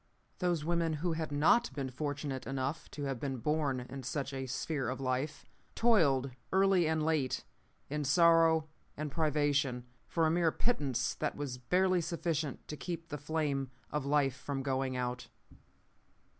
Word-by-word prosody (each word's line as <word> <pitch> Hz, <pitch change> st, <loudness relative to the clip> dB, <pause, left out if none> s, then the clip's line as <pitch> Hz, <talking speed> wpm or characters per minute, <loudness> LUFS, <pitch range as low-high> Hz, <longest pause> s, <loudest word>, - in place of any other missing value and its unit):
Those 175 Hz, -4 st, 0 dB
women 170 Hz, -1 st, +1 dB
who 165 Hz, +3 st, -1 dB
had 160 Hz, -2 st, -3 dB
not 160 Hz, -, +4 dB
been 135 Hz, -2 st, -3 dB
fortunate 145 Hz, 0 st, -3 dB
enough 135 Hz, +3 st, -3 dB
to 145 Hz, -, -6 dB
have 135 Hz, -3 st, -2 dB
been 135 Hz, -1 st, -2 dB
born 140 Hz, 0 st, 0 dB
in 130 Hz, +2 st, -7 dB
such 135 Hz, +2 st, -3 dB
a 130 Hz, -1 st, -3 dB
sphere 135 Hz, +2 st, -2 dB
of 130 Hz, -, -3 dB
life 130 Hz, +3 st, -2 dB, 0.3 s
toiled 145 Hz, -, +4 dB, 0.2 s
early 190 Hz, -3 st, +4 dB
and 160 Hz, -1 st, +1 dB
late, 155 Hz, -5 st, +1 dB, 0.4 s
in 150 Hz, +1 st, -2 dB
sorrow 165 Hz, +1 st, +5 dB, 0.3 s
and 150 Hz, 0 st, -3 dB
privation, 145 Hz, -4 st, +1 dB, 0.2 s
for 165 Hz, -2 st, +1 dB
a 155 Hz, -, +3 dB
mere 170 Hz, -1 st, +3 dB
pittance 145 Hz, -, 0 dB
that -, -, -2 dB
was 135 Hz, -4 st, -4 dB
barely 185 Hz, +6 st, +2 dB
sufficient 160 Hz, -3 st, -2 dB
to 150 Hz, -, -5 dB
keep 165 Hz, +2 st, -5 dB
the 150 Hz, -, -4 dB
flame 145 Hz, -3 st, -1 dB, 0.2 s
of 150 Hz, -2 st, -1 dB
life 140 Hz, -2 st, +2 dB
from 140 Hz, -1 st, -4 dB
going 130 Hz, -1 st, -1 dB
out. 125 Hz, 0 st, -3 dB
145 Hz, 155 wpm, -33 LUFS, 135-160 Hz, 0.4 s, sorrow